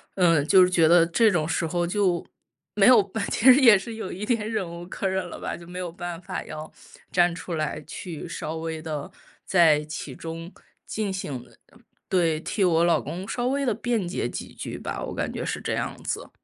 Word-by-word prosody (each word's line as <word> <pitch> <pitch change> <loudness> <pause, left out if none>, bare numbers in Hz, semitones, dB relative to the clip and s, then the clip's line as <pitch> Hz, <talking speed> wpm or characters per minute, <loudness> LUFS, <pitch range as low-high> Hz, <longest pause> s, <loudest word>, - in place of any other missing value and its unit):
嗯， 165 -6 +4
就 185 +2 +7
是 180 - +3
觉 165 -3 +4
得 170 0 +7
这 215 +5 +4
种 155 -4 0
时 165 +1 0
候 175 +1 0
就 185 -3 +1 0.5
没 205 +1 +5
有， 210 -6 +6 0.2
其 225 - -1
实 - - +8
也 230 -5 +8
是 225 +4 -7
有 220 -4 -5
一 195 +4 -5
点 220 -2 0
忍 210 -5 -1
无 170 +1 -8
可 195 - -3
忍 190 -1 -1
了 - - -8
吧， - - -4
就 170 - -13
没 180 +1 -8
有 180 -2 -4
办 175 -1 -6
法 - - -5
要 155 0 -8 0.4
站 175 -1 +3
出 170 0 -5
来 155 -1 -3
去 170 -1 -7
稍 160 -1 -5
微 160 -1 -4
地 155 +2 -5 0.3
在 160 -5 +4
其 150 -3 -7
中 165 +3 -7 0.4
进 215 -2 -2
行 140 -9 -5 0.6
对， 165 -4 +2
替 200 +5 -1
我 170 -2 +4
老 170 0 +4
公 185 +3 -6
稍 245 - -2
微 280 +2 0
地 240 - +2
辩 230 -6 -1
解 175 - -2
几 - - -6
句 - - -6
吧， - - -4
我 - - -5
感 - - -2
觉 - - -4
是 - - -3
这 - - -2
样 - - -2
子。 - - -4
175 Hz, 230 characters per minute, -25 LUFS, 165-195 Hz, 0.6 s, 实